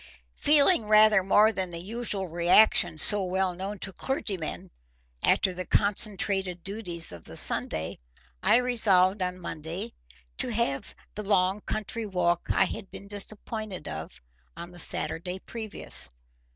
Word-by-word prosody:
Feeling 295 Hz, -, +4 dB
rather 215 Hz, -1 st, +6 dB
more 210 Hz, +3 st, +4 dB
than 190 Hz, -2 st, -3 dB
the 170 Hz, -, -6 dB
usual 205 Hz, +1 st, -2 dB
reaction 175 Hz, 0 st, +3 dB
so 205 Hz, +5 st, +6 dB
well 185 Hz, 0 st, -1 dB
known 195 Hz, +3 st, -5 dB
to 195 Hz, 0 st, -4 dB
clergymen 200 Hz, -, -4 dB, 0.5 s
after 190 Hz, -, +3 dB
the 185 Hz, +1 st, -5 dB
concentrated 195 Hz, -3 st, 0 dB
duties 185 Hz, -5 st, -3 dB
of 85 Hz, -2 st, -11 dB
the -, -, -9 dB
Sunday, 80 Hz, +1 st, -1 dB, 0.4 s
I -, -, +4 dB
resolved 205 Hz, -6 st, +3 dB
on 180 Hz, 0 st, -2 dB
Monday 170 Hz, +6 st, -5 dB, 0.4 s
to -, -, +2 dB
have 215 Hz, -12 st, -2 dB, 0.2 s
the 210 Hz, -, -5 dB
long 195 Hz, 0 st, +1 dB
country 215 Hz, +2 st, -4 dB
walk 175 Hz, -3 st, 0 dB
I -, -, +3 dB
had 195 Hz, +1 st, -7 dB
been 200 Hz, -, -10 dB
disappointed 205 Hz, -2 st, -4 dB
of 80 Hz, 0 st, -7 dB, 0.4 s
on 170 Hz, +1 st, -8 dB
the 175 Hz, -, -13 dB
Saturday 170 Hz, +3 st, -1 dB
previous. 220 Hz, -, -1 dB
190 Hz, 140 wpm, -27 LUFS, 175-215 Hz, 0.5 s, rather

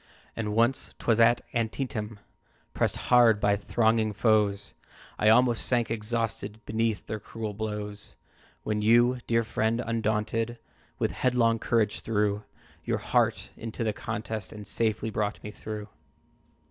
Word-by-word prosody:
"And 105 Hz, -2 st, -2 dB
once, 120 Hz, +3 st, +1 dB
'twas 115 Hz, -1 st, +1 dB
at 115 Hz, +1 st, +5 dB
Antietam, 115 Hz, -2 st, -2 dB, 0.6 s
Pressed -, -, 0 dB
hard 120 Hz, -4 st, +5 dB
by 100 Hz, 0 st, +3 dB
thronging 110 Hz, +1 st, +1 dB
foes, 105 Hz, -2 st, +2 dB, 0.5 s
I 105 Hz, -, +4 dB
almost 120 Hz, 0 st, +4 dB
sank 120 Hz, -3 st, +1 dB
exhausted 110 Hz, -1 st, -3 dB
Beneath 110 Hz, -1 st, -1 dB
their 110 Hz, -, -4 dB
cruel 110 Hz, 0 st, -6 dB
blows, 105 Hz, -1 st, -5 dB, 0.5 s
When 105 Hz, -1 st, -1 dB
you, 120 Hz, +3 st, +4 dB
dear 115 Hz, 0 st, +2 dB
friend, 110 Hz, +1 st, 0 dB
undaunted, 115 Hz, +1 st, -1 dB, 0.4 s
With -, -, 0 dB
headlong 120 Hz, -3 st, +2 dB
courage 110 Hz, -3 st, +1 dB
threw 105 Hz, -1 st, 0 dB, 0.4 s
Your -, -, 0 dB
heart -, -, 0 dB
into 115 Hz, +1 st, -5 dB
the 110 Hz, -1 st, 0 dB
contest, 110 Hz, +1 st, -5 dB
And 105 Hz, -1 st, -9 dB
safely 110 Hz, +1 st, -1 dB
brought 105 Hz, 0 st, -2 dB
me 105 Hz, -, -6 dB
through. 105 Hz, -1 st, -7 dB
110 Hz, 135 wpm, -28 LUFS, 105-115 Hz, 0.6 s, at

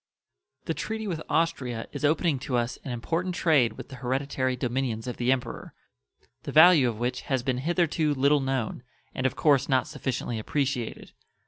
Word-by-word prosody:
The -, -, -1 dB
treaty 220 Hz, 0 st, -4 dB
with 165 Hz, -5 st, -3 dB
Austria 135 Hz, -9 st, -1 dB
is 145 Hz, -, -7 dB
opening 155 Hz, -1 st, +2 dB
to 125 Hz, -1 st, -2 dB
us 120 Hz, 0 st, -2 dB
an -, -, -6 dB
important 165 Hz, +10 st, -2 dB
trade 140 Hz, -11 st, +3 dB
with -, -, -10 dB
the 135 Hz, -, -9 dB
hereditary 130 Hz, 0 st, -1 dB
dominions 125 Hz, -2 st, -2 dB
of 125 Hz, -, -5 dB
the 125 Hz, +1 st, +1 dB
Emperor, 130 Hz, -2 st, -3 dB, 0.7 s
the -, -, -6 dB
value 155 Hz, -5 st, +7 dB
of 110 Hz, -, -5 dB
which 125 Hz, +2 st, -2 dB
has 130 Hz, -3 st, +1 dB
been 130 Hz, -1 st, -1 dB
hitherto 160 Hz, -1 st, +1 dB
little 140 Hz, +2 st, +3 dB
known, 130 Hz, -4 st, -2 dB, 0.3 s
and 130 Hz, -, 0 dB
of -, -, -5 dB
course 140 Hz, -3 st, +3 dB
not 130 Hz, -1 st, +3 dB
sufficiently 130 Hz, -6 st, -3 dB
appreciated. 130 Hz, 0 st, -2 dB
135 Hz, 175 wpm, -27 LUFS, 125-150 Hz, 0.7 s, value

